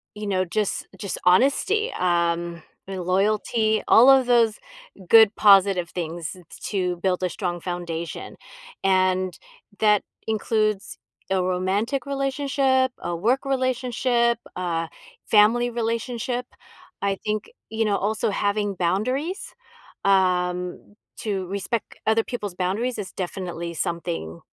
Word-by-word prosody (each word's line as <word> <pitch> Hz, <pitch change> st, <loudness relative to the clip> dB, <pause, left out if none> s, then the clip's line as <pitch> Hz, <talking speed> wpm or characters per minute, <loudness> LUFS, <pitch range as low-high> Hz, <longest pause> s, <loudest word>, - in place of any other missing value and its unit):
you 210 Hz, 0 st, -6 dB
know, 185 Hz, -2 st, +1 dB
just 210 Hz, +3 st, -2 dB
just 195 Hz, 0 st, -4 dB
honesty, 280 Hz, -, +3 dB
um, 170 Hz, -1 st, 0 dB, 0.2 s
and 190 Hz, -1 st, -5 dB
loyalty, 215 Hz, +4 st, +1 dB
all 245 Hz, +4 st, +7 dB
of 265 Hz, -1 st, +6 dB
those 235 Hz, -3 st, +3 dB, 0.5 s
good 220 Hz, 0 st, +7 dB
positive 195 Hz, -4 st, +5 dB
things 170 Hz, -1 st, -4 dB
t 185 Hz, -, -14 dB, 0.3 s
to 180 Hz, -3 st, -1 dB
build 180 Hz, +1 st, 0 dB
a 180 Hz, -, +1 dB
strong 175 Hz, -1 st, -3 dB
foundation, 170 Hz, -2 st, -5 dB, 0.5 s
and 185 Hz, -1 st, +2 dB, 0.4 s
that 210 Hz, -2 st, +4 dB, 0.3 s
includes 215 Hz, -2 st, 0 dB, 0.3 s
a 190 Hz, -1 st, +2 dB
romantic 195 Hz, +8 st, -1 dB
relationship, 275 Hz, -1 st, +1 dB
a 175 Hz, -, -3 dB
work 235 Hz, +11 st, +1 dB
relationship, 250 Hz, -2 st, +1 dB, 0.2 s
uh, 170 Hz, -2 st, -2 dB, 0.4 s
family 225 Hz, +3 st, +4 dB
relationship. 235 Hz, +1 st, -2 dB, 0.6 s
I 200 Hz, -1 st, +1 dB
think, 215 Hz, 0 st, -2 dB, 0.2 s
you 225 Hz, 0 st, 0 dB
know, 205 Hz, -1 st, +2 dB
also 215 Hz, +1 st, -1 dB
having 205 Hz, +1 st, 0 dB
boundaries, 255 Hz, -, -1 dB, 0.5 s
um, 180 Hz, -1 st, +1 dB, 0.2 s
to 195 Hz, -4 st, -2 dB
respect 200 Hz, +4 st, -3 dB
other 220 Hz, +1 st, +3 dB
people's 210 Hz, -7 st, -5 dB
boundaries 200 Hz, +8 st, -1 dB
is 205 Hz, -3 st, -5 dB
definitely 175 Hz, -2 st, -5 dB
something, 165 Hz, -, -3 dB
200 Hz, 115 wpm, -24 LUFS, 180-235 Hz, 0.6 s, all